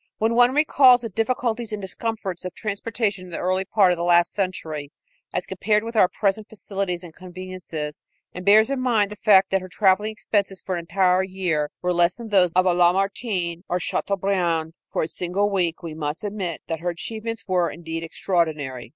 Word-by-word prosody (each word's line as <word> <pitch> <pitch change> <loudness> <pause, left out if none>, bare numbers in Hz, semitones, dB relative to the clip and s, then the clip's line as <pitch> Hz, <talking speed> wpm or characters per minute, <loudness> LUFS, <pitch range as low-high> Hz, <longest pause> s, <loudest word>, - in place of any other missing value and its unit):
When 225 +1 +1
one 245 +2 +4
recalls 270 -5 +6
the 230 - -5
difficulties 230 +1 -1
and 210 - -3
discomforts 195 -1 -4
of 180 -1 -6
transportation 210 -2 -2
in - - -12
the 170 - -4
early 185 +1 0
part 195 -1 +4
of 175 - -1
the - - -1
last 175 0 +4
century, 160 -7 -3 0.4
as - - -2
compared 210 0 0
with 230 +1 -6
our 200 -4 +6
present 210 +2 -1
facilities 195 -4 -4
and 170 -2 -11
conveniences, 180 -4 -7 0.3
and 180 - -7
bears 215 +5 +5
in 275 - -1
mind 225 -5 +2
the - - -6
fact 195 -2 +4
that 195 0 +2
her 185 - -9
traveling 195 +2 +2
expenses 200 -3 -2
for 190 - -3
an 175 - -1
entire 180 +2 +2
year 180 -6 -1
were 180 0 +1
less 175 0 +3
than 235 -2 -8
those 185 -4 +4
of 185 0 +3
a 180 - +4
Lamartine 180 0 +1
or 180 - +1
a - - -4
Chateaubriand 175 -4 -1 0.2
for - - 0
a - - -2
single 185 +5 -1
week, 175 -4 -1
we 165 -2 -5
must 150 +2 -4
admit 195 -5 -4
that 165 -1 -4
her 175 +2 -2
achievements 220 +5 -5
were, 180 -2 +2
indeed, 165 -1 -6
extraordinary. 160 -7 -2
185 Hz, 195 wpm, -23 LUFS, 175-210 Hz, 0.4 s, recalls